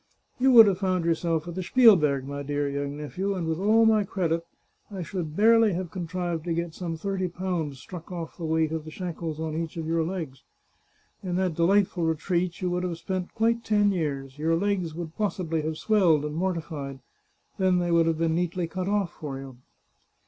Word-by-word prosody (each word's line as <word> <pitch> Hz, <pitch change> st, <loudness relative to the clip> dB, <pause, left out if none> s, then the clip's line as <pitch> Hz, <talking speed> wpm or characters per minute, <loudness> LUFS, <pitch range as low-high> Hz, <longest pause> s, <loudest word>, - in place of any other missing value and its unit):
You 265 Hz, +1 st, +4 dB
would 230 Hz, -2 st, +11 dB
have 195 Hz, -3 st, +1 dB
found 185 Hz, -3 st, 0 dB
yourself 165 Hz, -1 st, 0 dB
at 175 Hz, -, -5 dB
the 185 Hz, -, -3 dB
Spielberg, 170 Hz, -, +5 dB
my 140 Hz, 0 st, -5 dB
dear 145 Hz, 0 st, -1 dB
young 140 Hz, 0 st, -3 dB
nephew, 185 Hz, +7 st, -3 dB
and 175 Hz, -3 st, -3 dB
with 160 Hz, +1 st, -1 dB
all 220 Hz, +3 st, +4 dB
my 220 Hz, -1 st, +4 dB
credit, 170 Hz, -4 st, -1 dB, 0.5 s
I 195 Hz, -4 st, -5 dB
should 165 Hz, -3 st, -5 dB
barely 225 Hz, 0 st, +5 dB
have 175 Hz, -1 st, -4 dB
con 175 Hz, -3 st, -5 dB
trived 175 Hz, -2 st, -3 dB
to 170 Hz, -2 st, -1 dB
get 170 Hz, -1 st, -3 dB
some 170 Hz, -2 st, -4 dB
thirty 190 Hz, +1 st, -2 dB
pounds 175 Hz, -5 st, -3 dB
struck 170 Hz, +8 st, -10 dB
oft 170 Hz, -1 st, -6 dB
the 165 Hz, -, -4 dB
weight 160 Hz, 0 st, +1 dB
of 160 Hz, -1 st, -3 dB
the 155 Hz, -, -9 dB
shackles 165 Hz, -2 st, -5 dB
on 160 Hz, -1 st, -3 dB
each 165 Hz, 0 st, -4 dB
of 165 Hz, -, -3 dB
your 165 Hz, 0 st, +1 dB
legs. 160 Hz, -7 st, -5 dB, 0.8 s
In 180 Hz, -2 st, -3 dB
that 185 Hz, -2 st, 0 dB
delightful 180 Hz, +2 st, +2 dB
retreat 170 Hz, +3 st, -1 dB
you 180 Hz, -1 st, 0 dB
would 180 Hz, 0 st, 0 dB
have 180 Hz, -2 st, -3 dB
spent 185 Hz, 0 st, -4 dB
quite 230 Hz, +1 st, +1 dB
ten 205 Hz, -2 st, +3 dB
years; 140 Hz, -6 st, -3 dB
your 165 Hz, +2 st, +2 dB
legs 185 Hz, -3 st, -1 dB
would 165 Hz, -1 st, -6 dB
possibly 180 Hz, -6 st, -1 dB
have 155 Hz, +1 st, -3 dB
swelled 175 Hz, -9 st, +3 dB
and 150 Hz, -, -4 dB
mortified. 160 Hz, -6 st, -3 dB, 0.6 s
Then 185 Hz, -1 st, +3 dB
they 175 Hz, -1 st, 0 dB
would 165 Hz, -1 st, +4 dB
have 165 Hz, -1 st, +1 dB
been 165 Hz, 0 st, +1 dB
neatly 175 Hz, +1 st, -1 dB
cut 185 Hz, +2 st, -4 dB
oflf 200 Hz, -3 st, +1 dB
for 145 Hz, -5 st, -7 dB
you." 135 Hz, -2 st, -9 dB
170 Hz, 205 wpm, -26 LUFS, 160-185 Hz, 0.8 s, would